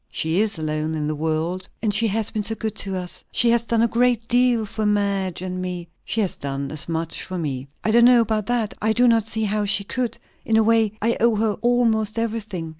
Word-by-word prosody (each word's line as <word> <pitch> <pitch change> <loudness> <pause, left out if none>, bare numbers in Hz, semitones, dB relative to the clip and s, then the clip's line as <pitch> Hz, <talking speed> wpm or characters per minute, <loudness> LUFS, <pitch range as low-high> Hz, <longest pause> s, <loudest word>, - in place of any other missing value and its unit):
"She 160 +5 +1
is 220 -3 -1
alone 155 0 -2
in 150 -1 -2
the 155 - -1
world." 160 +4 -2
"And 215 -3 0
she 225 +3 +2
has 220 +1 -1
been 215 - -2
so 225 +2 -1
good 220 -2 -3
to 195 -1 -3
us! 180 -1 -2
She 235 -1 +4
has 235 0 +3
done 230 -1 +2
a - - +4
great 235 0 +1
deal 245 -2 +3
for 215 +1 -4
Madge 200 -3 0
and 185 0 -4
me." 180 -2 -5
"She 225 - -1
has 195 - -1
done 140 0 -4
as 155 +2 -3
much 165 0 -3
for 185 - -5
me." 140 -5 -3 0.2
"I 215 - +1
don't 235 +1 +6
know 245 -1 +7
about 215 -2 -1
that. 235 -4 0
I 220 +1 +2
do 245 +2 +4
not 225 -2 +3
see 220 -1 -1
how 210 0 0
she 200 0 +2
could. 245 +3 -3 0.3
In 220 - +2
a 220 - +5
way, 225 -1 +3
I 230 +1 +1
owe 235 0 +3
her 215 0 +1
almost 230 -3 +1
everything. 215 -7 -3
215 Hz, 240 wpm, -22 LUFS, 180-230 Hz, 0.3 s, know